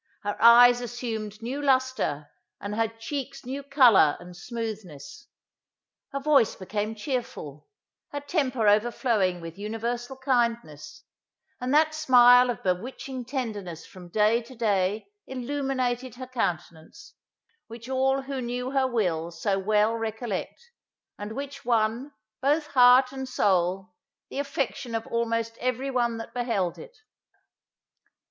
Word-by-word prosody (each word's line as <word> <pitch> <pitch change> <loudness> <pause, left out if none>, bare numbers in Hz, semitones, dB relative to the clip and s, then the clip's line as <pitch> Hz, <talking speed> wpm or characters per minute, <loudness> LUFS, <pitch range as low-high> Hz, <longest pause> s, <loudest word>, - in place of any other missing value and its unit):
Her 205 0 -2
eyes 240 +1 +8
assumed 225 -3 -5
new 265 +5 -3
lustre, 260 - 0 0.3
and 200 +1 -5
her 225 +1 +1
cheeks 270 +5 -6
new 270 +3 -4
colour 255 - +5
and 180 0 -12
smoothness. 220 - -7 0.8
Her 275 - -3
voice 275 -5 +3
became 210 +3 -4
chearful; 210 - -5 0.4
her 290 - -3
temper 275 - 0
overflowing 210 -4 +2
with 165 +3 -9
universal 235 +4 -4
kindness; 235 - -2 0.6
and 250 +1 -3
that 310 0 +4
smile 250 -4 +6
of 235 - -4
bewitching 245 +7 -3
tenderness 210 - -5
from 180 -2 -13
day 215 +5 +3
to 240 +3 -13
day 205 -2 0 0.2
illuminated 260 -2 -2
her 255 +1 -7
countenance, 225 - -5 0.5
which 230 +1 -10
all 265 +1 +1
who 270 -1 -4
knew 250 +1 -3
her 270 -1 +2
will 180 -9 -1
so 195 +4 -1
well 210 +2 +2
recollect, 225 - -5 0.5
and 205 +1 -6
which 275 +2 -7
won, 235 +3 0 0.3
both 295 +3 +2
heart 255 -2 +6
and 265 -1 -6
soul, 185 -3 0 0.4
the - - -4
affection 275 -4 -3
of 225 - -3
almost 230 0 -2
every 255 +2 -2
one 240 -2 0
that 225 - -8
beheld 230 -8 -1
it. 485 0 -12
235 Hz, 125 wpm, -26 LUFS, 210-260 Hz, 0.8 s, eyes